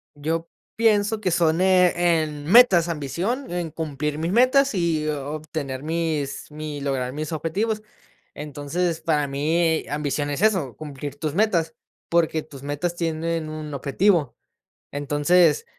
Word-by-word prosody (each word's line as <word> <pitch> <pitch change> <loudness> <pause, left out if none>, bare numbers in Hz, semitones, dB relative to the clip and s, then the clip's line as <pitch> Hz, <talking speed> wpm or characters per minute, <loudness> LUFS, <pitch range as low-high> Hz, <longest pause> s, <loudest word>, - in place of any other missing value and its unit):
Yo 165 +3 -2 0.3
pienso 220 -1 +2
que 185 - +1
son, 165 -1 +2
eh, 175 -3 +4
en 150 -2 -6
metas 190 -5 +6
ambición, 175 - -3
en 175 -2 -3
cumplir 150 -1 -3
mis 165 +2 -1
metas 255 +2 +4
y 165 -4 0
o 145 -1 -3
obtener 150 -4 -5
mis 155 -3 -2
mi 150 -1 -6
lograr 130 -2 -2
mis 155 +2 -4
objetivos. 200 +8 -1 0.5
Entonces, 150 +4 -3
para 155 -3 +1
mí, 160 +4 +1
ambición 145 0 -2
es 145 - -3
eso, 185 - +2
cumplir 145 -2 -7
tus 150 0 -3
metas, 190 -6 +1 0.4
porque 160 -2 +2
tus 135 -2 -13
metas 145 +5 -2
tienen 165 -1 -2
un 155 -1 -6
objetivo, 145 +2 +1 0.6
entonces, 145 +3 +2
160 Hz, 135 wpm, -23 LUFS, 145-175 Hz, 0.6 s, metas